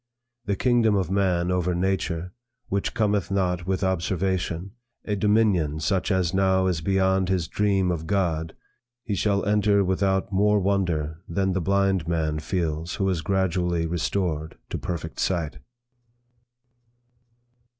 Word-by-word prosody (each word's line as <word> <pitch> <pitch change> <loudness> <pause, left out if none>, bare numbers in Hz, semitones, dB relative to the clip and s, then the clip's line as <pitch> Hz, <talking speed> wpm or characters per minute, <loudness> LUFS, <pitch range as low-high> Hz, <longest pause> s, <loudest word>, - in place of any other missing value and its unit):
The 100 - 0
kingdom 120 -1 +3
of 95 -2 0
man 90 -3 +1
over 90 -1 0
nature, 90 -1 -1 0.4
which 100 +4 -1
cometh 105 -4 +1
not 90 -2 -1
with 95 +1 0
observation, 95 0 -1 0.3
a 105 - -1
dominion 100 -8 +2
such 95 +4 0
as 90 -3 +1
now 95 -1 +3
is 90 -4 0
beyond 95 0 +1
his 90 -4 0
dream 100 -2 +1
of 80 -2 -4
God, 80 -4 -1 0.5
he 105 - -3
shall 100 0 +1
enter 100 0 +3
without 95 +1 0
more 105 +2 +3
wonder 85 -5 -1
than 95 +2 0
the 95 - 0
blind 95 -1 +1
man 80 -2 0
feels 80 -1 -2
who 95 - 0
is 90 -4 0
gradually 90 -3 0
restored 85 -2 -2
to - - -3
perfect 85 -5 -5
sight.' 85 -6 -1
95 Hz, 135 wpm, -25 LUFS, 85-100 Hz, 0.5 s, kingdom